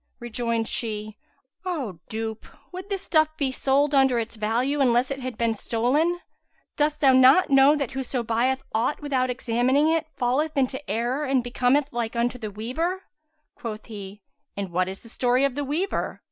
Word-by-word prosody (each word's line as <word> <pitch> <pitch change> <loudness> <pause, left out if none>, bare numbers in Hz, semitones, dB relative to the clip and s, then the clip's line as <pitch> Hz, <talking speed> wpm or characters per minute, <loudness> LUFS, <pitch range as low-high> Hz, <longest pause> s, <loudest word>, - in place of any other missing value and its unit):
Rejoined 230 -1 -2
she, 215 -2 -3 0.4
"O 275 - -4
dupe, 220 0 -5 0.2
would 370 +2 -8
this 390 -1 -3
stuff 310 -1 +2
be 280 -4 0
sold 275 +3 +1
under 265 -3 +4
its 230 0 -3
value, 240 +7 0
unless 245 0 +3
it 275 - -3
had 255 -1 -5
been 230 -1 +1
stolen? 265 +11 0 0.6
Dost 300 0 0
thou 270 -2 +6
not 265 +6 +6
know 275 +2 +6
that 280 -3 -2
whoso 265 -2 -3
buyeth 245 +4 0
aught 235 +7 0
without 260 -3 0
examining 250 +4 +2
it, 325 -1 +1
falleth 285 +5 0
into 265 0 0
error 245 +6 -1
and 265 -2 +1
becometh 250 +4 +1
like 235 -1 -2
unto 240 +1 0
the 215 -2 -4
weaver?" 315 - -3 0.5
Quoth 215 -3 -7
he, 205 -2 -9 0.3
"And 195 -3 -4
what 180 +1 +1
is 190 - -8
the - - -15
story 250 +3 +2
of 275 - 0
the 290 +2 -3
weaver?" 320 +8 -2
255 Hz, 175 wpm, -25 LUFS, 230-285 Hz, 0.6 s, thou